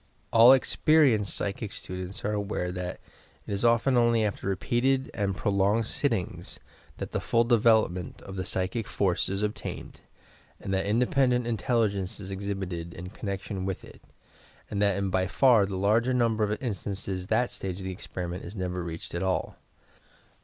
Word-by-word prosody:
All 115 +2 +9
experienced 135 -5 +4
psychic 100 +1 -3
students 90 +2 -6
are 105 - +1
aware 100 -3 -2
that 90 0 -5 0.5
it - - -4
is 100 - -1
often 120 +3 +3
only 115 -2 +3
after 100 -2 -3
repeated 130 +7 +1
and 100 -2 -1
prolonged 100 +4 +1
sittings, - - -1 0.4
that - - -5
the - - -1
full 115 0 +2
development 110 - +2
of 95 - -8
the 95 - -2
psychic 95 +5 -1
force 95 -3 0
is 95 +2 -1
obtained 105 0 -5 0.6
and 95 - -4
that 95 +1 0
independent 125 +2 +2
intelligence 110 -5 0
is 100 -1 -7
exhibited 95 -4 -4
in 90 +2 -7
connection 100 -1 -4
with 95 0 -3
it - - -15 0.7
and 100 -1 -1
that 100 -2 +3
in 100 -1 -1
by 95 0 +1
far 115 -1 +4
the 95 -1 -4
larger 115 +6 +2
number 115 -3 +2
of 105 0 -1
instances 95 -4 -4
that 115 +3 +1
stage 95 -2 -5
of 95 - -7
the 95 - -3
experiment 90 0 -6
is 90 +5 -8
never 90 -2 -3
reached 85 -1 -6
at 85 - -2
all. 95 -1 -1
100 Hz, 165 wpm, -28 LUFS, 95-115 Hz, 0.7 s, All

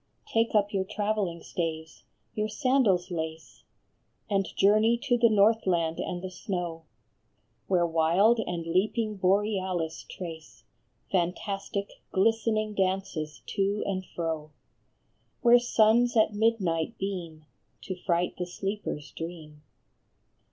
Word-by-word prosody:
Take 230 - 0
up 205 0 +2
your 195 -1 +1
travelling 205 -4 -2
staves, 160 -2 -4 0.3
your 215 0 -1
sandals 215 -6 +2
lace, 160 -1 -5 0.7
And 195 -1 +2
journey 215 +4 +4
to 265 -3 +2
the 235 -1 +4
Northland 195 -6 +2
and 175 0 -3
the 185 - -5
snow, 175 -3 -4 0.8
Where 180 -3 +3
wild 170 +8 +3
and 175 -6 -3
leaping 210 +5 0
Borealis 190 -3 0
trace 165 -3 -9 0.5
Fantastic, 195 +2 -2
glistening 215 +1 +1
dances 185 -6 -2
to 200 +1 0
and 190 -1 -2
fro; 160 -4 -4 0.9
Where 240 0 +7
suns 240 0 +3
at 215 -1 +4
midnight 205 -4 0
beam, 170 -5 -5 0.4
to 185 - -4
fright 175 -1 0
the 180 - -2
sleeper 195 +2 -3
s 145 -2 -13
dream. 160 -3 -8
190 Hz, 115 wpm, -28 LUFS, 170-215 Hz, 0.9 s, Where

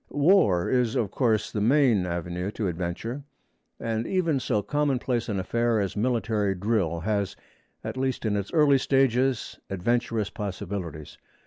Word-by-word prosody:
War 145 - +3
is, 125 -1 +1
of 110 -6 0
course, 110 -5 +1
the 105 - -2
main 120 -5 +3
avenue 85 +2 -3
to 105 - -2
adventure, 90 - -4 0.6
and 115 0 -2
even 170 -7 +1
so 105 -4 0
commonplace 130 -2 0
an 100 -2 -1
affair 115 +3 +1
as 100 -2 -2
military 110 -3 0
drill 90 -4 0
has, 100 0 -1 0.5
at - - -5
least 130 -2 -1
in 105 -2 +1
its 100 -1 -3
early 145 -4 +4
stages, 135 -1 +1
adventurous 115 +2 -1
possibilities. 90 -6 -6
110 Hz, 140 wpm, -26 LUFS, 95-130 Hz, 0.6 s, early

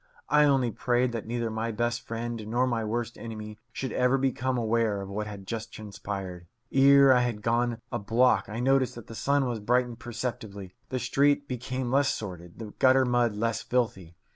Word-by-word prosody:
I 150 0 +5
only 135 -4 +3
prayed 125 +3 +1
that 115 -2 -5
neither 115 -1 -2
my 110 +1 -2
best 120 +2 -1
friend 115 -1 -5
nor 120 +3 +1
my 120 -3 -1
worst 120 +2 -3
enemy 110 -2 -7
should 130 +2 -4
ever 125 +1 +2
become 130 -1 0
aware 115 -2 +1
of 95 0 -6
what 105 +2 -3
had 100 -2 -8
just 115 +1 -5
transpired. 100 -4 -7 0.2
Ere 140 0 +7
I 125 - +4
had 115 -4 -2
gone 120 0 0
a 120 - -1
block 115 +2 +2
I 110 +2 -4
noticed 135 0 +2
that 120 - -9
the - - -10
sun 140 +3 +1
had 115 -4 -4
brightened 120 +1 +1
perceptibly, 110 -6 -5 0.2
the 130 - -2
street 140 +3 +2
become 125 0 -3
less 140 +1 +3
sordid, 90 -4 -6
the 110 -3 -8
gutter 130 0 +5
mud 120 -3 +2
less 115 +1 -1
filthy. 110 -9 -2
120 Hz, 190 wpm, -28 LUFS, 110-125 Hz, 0.2 s, Ere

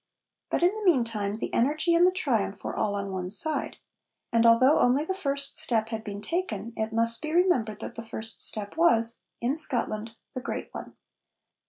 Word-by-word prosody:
But, - - 0
in 360 +3 +5
the 435 0 -5
meantime, 230 - +1
the - - -4
energy 305 +7 +2
and 345 +2 +6
the - - +4
triumph 230 - -1
were - - -3
all 205 -1 0
on 200 -1 -3
one 180 -1 -3
side. 300 +11 -2 0.6
And 230 0 +5
although 255 +6 +6
only 265 +5 +3
the 380 - -1
first 280 -7 -2
step 225 -2 0
had 220 -1 -4
been 205 -1 -6
taken, 235 - -3
it 220 0 -2
must 230 +1 0
be 310 - -3
remembered 300 - +2
that - - -6
the 230 - -6
first 225 0 -5
step 210 +4 -5
was, 230 - +3 0.2
in 250 +4 +1
Scotland, 230 -7 -2 0.2
the 255 - -4
great - - -4
one. - - -8
230 Hz, 190 wpm, -27 LUFS, 220-310 Hz, 0.6 s, and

